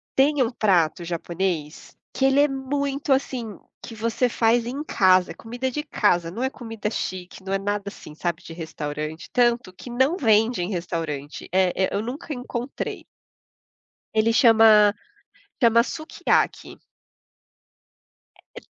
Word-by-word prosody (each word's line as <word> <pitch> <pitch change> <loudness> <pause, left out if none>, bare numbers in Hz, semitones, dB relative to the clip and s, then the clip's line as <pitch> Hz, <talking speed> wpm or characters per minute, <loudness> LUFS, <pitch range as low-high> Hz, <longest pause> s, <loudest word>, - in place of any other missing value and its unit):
Tem 280 +1 +3
um 240 - +2
prato 180 -8 +1
japonês, 170 -2 -4 0.2
que - - -2
ele 270 +1 +4
é 290 - +5
muito 275 +1 -2
assim, 250 -5 -1 0.2
que - - -8
você 230 +3 0
faz 230 0 +2
em 265 +5 -4
casa, 185 -9 +3
comida 245 +3 -4
de 295 +4 -4
casa, 175 - +1
não 225 - -6
é 260 - +1
comida 225 -5 -5
chique, 185 -3 -5
não 190 - -6
é 195 - +1
nada 205 +1 -2
assim, 155 -6 -9
sabe, 170 0 -3
de 165 - -10
restaurante, 155 -1 -6
tanto 240 -5 +2
que 215 - -11
não 260 +7 +2
vende 225 - +3
em 175 - -2
restaurante, 165 -5 -4
eh 185 0 +2
eh, 190 - +1
eu 200 - 0
nunca 265 +7 -5
encontrei. 245 0 -5 1.1
Ele 220 +1 +3
chama 220 -4 +6 0.7
Tamasukiaki. 235 +6 +1 1.8
É - - -4
e - - -27
220 Hz, 140 wpm, -24 LUFS, 180-250 Hz, 1.8 s, chama